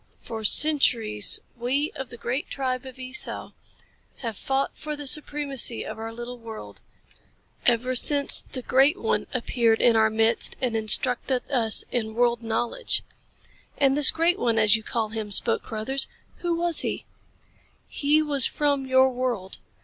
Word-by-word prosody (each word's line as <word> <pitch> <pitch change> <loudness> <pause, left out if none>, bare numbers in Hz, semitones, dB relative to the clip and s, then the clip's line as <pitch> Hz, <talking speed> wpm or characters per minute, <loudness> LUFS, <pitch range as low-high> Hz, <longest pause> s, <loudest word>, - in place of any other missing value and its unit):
"For 220 -1 -8
centuries, 225 -6 +4
we 260 +5 -2
of 265 -2 -8
the 240 - -11
great 245 +4 -4
tribe 260 -1 -4
of 260 - -12
Esau 255 0 -5 0.7
have 230 -4 -5
fought 270 +6 -3
for 305 -1 -6
the 290 0 -9
supremacy 280 -4 0
of - - -8
our 225 0 -6
little 240 +1 -9
world 220 - -10 0.9
ever 245 +1 +1
since 280 +3 +5
the 255 - -9
Great 270 +8 +2
One - - -2
appeared 235 -2 0
in 235 -2 +3
our 220 0 +3
midst 225 +1 +1
and 245 -3 -2
instructed 245 +3 +1
us 230 -5 +1
in 220 -2 -3
world 240 0 +1
knowledge." 235 - -2 0.7
"And 275 -1 +2
this 290 -2 +7
Great 340 +3 0
One, 230 -2 0
as 215 0 +4
you 220 - -2
call 220 -1 -3
him," 215 -1 -6
spoke 225 +3 +4
Carruthers. 245 +5 -2 0.3
"Who 345 -1 -2
was 340 -1 0
he?" - - -3 0.8
"He 300 +2 0
was 285 -4 +3
from 285 -2 -2
your 260 0 +4
world. 245 -7 -4
250 Hz, 155 wpm, -24 LUFS, 225-275 Hz, 0.9 s, this